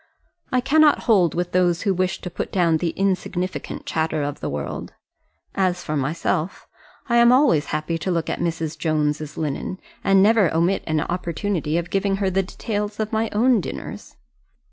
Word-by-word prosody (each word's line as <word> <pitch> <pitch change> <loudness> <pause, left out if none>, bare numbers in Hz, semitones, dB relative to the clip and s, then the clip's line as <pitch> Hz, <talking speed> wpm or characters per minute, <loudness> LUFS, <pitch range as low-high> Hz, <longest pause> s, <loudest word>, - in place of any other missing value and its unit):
I 255 - +2
cannot 300 +3 +4
hold 190 - +3
with 175 0 -2
those 175 -2 +2
who 200 -3 +2
wish 185 0 -1
to 180 - -6
put - - -4
down 170 -4 +3
the 170 +1 -1
insignificant 185 -1 -2
chatter 160 -1 -1
of 145 +1 -4
the - - -3
world. 70 0 -5 0.6
As 185 -2 0
for 155 - -3
myself, 155 +4 -2 0.4
I 235 -2 +2
am 235 0 +6
always 250 - +4
happy 155 +2 -2
to 175 - -3
look 170 -3 0
at - - -2
Mrs. 165 -2 -2
Jones's 150 -1 -1
linen, 155 +4 -3 0.3
and 195 -1 +5
never 210 -4 +4
omit 175 +4 +2
an 155 -2 +1
opportunity 170 -1 -2
of 170 +1 -3
giving 195 0 +1
her 195 -1 0
the 190 +1 +2
details 205 +2 -4
of 215 +1 -2
my 220 +1 +1
own 235 +1 +3
dinners. 70 - -7
180 Hz, 175 wpm, -22 LUFS, 160-205 Hz, 0.6 s, am